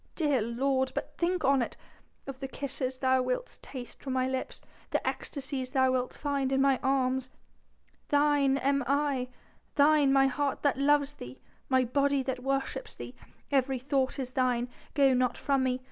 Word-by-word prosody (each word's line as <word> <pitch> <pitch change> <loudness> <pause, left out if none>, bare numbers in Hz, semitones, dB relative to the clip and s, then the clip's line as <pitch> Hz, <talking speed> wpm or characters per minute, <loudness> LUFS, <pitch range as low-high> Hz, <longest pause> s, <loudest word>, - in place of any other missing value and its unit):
Dear 290 -7 +2
lord, 260 +3 0
but - - -4
think 355 0 0
on 275 -1 +4
it 235 - -4 0.5
of 275 -1 -7
the 270 - -4
kisses 265 -1 -3
thou 260 0 +2
wilt 255 - -3
taste 250 -3 -9
from 265 - -4
my 255 0 +1
lips 260 0 -3 0.3
the - - -1
ecstasies 265 -2 -3
thou 260 -1 +4
wilt 255 -1 -1
find 280 -2 -1
in 270 - +2
my 270 -1 +3
arms!... 260 -1 +1 0.8
Thine 290 -2 +3
am 275 0 +1
I 280 -2 0 0.5
thine 290 -1 +5
my 270 0 +5
heart 275 +1 -1
that 280 -2 +2
loves 290 0 +3
thee 125 - -10 0.3
my 260 -1 +4
body 280 +2 +1
that 260 -1 -3
worships 275 - -2
thee - - -8
my - - -19 0.3
every 265 0 +1
thought 265 +1 0
is 255 -2 -4
thine.... 250 -1 0 0.3
Go 275 -3 +5
not 250 -1 +1
from 275 -1 +1
me 255 -1 0
270 Hz, 175 wpm, -29 LUFS, 255-280 Hz, 0.8 s, thine